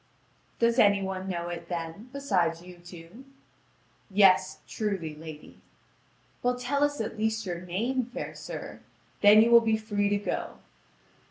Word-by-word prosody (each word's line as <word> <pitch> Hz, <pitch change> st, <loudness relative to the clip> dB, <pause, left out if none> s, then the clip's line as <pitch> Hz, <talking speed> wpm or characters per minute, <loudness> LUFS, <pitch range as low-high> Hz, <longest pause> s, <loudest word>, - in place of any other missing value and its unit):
"Does 235 Hz, +1 st, +2 dB
any 200 Hz, -1 st, +5 dB
one 190 Hz, 0 st, -4 dB
know 175 Hz, -1 st, -3 dB
it, 170 Hz, -1 st, -7 dB
then, 170 Hz, +6 st, -5 dB
beside 185 Hz, -12 st, 0 dB
you 180 Hz, 0 st, -13 dB
two?" 175 Hz, +6 st, -13 dB, 0.9 s
"Yes, 195 Hz, -1 st, +4 dB
truly, 195 Hz, -8 st, -3 dB
lady." 155 Hz, -1 st, -11 dB, 0.8 s
"Well, 245 Hz, 0 st, 0 dB
tell 275 Hz, +3 st, 0 dB
us 290 Hz, 0 st, 0 dB
at 220 Hz, 0 st, -4 dB
least 220 Hz, 0 st, -1 dB
your 175 Hz, -2 st, -4 dB
name, 225 Hz, +9 st, -2 dB
fair 245 Hz, -, -6 dB
sir; -, -, -8 dB, 0.4 s
then 210 Hz, +1 st, +8 dB
you 235 Hz, -, +2 dB
will 235 Hz, 0 st, +8 dB
be 220 Hz, -1 st, +1 dB
free 205 Hz, -2 st, -1 dB
to 205 Hz, -, +1 dB
go." 205 Hz, -, -4 dB
205 Hz, 150 wpm, -28 LUFS, 175-230 Hz, 0.9 s, then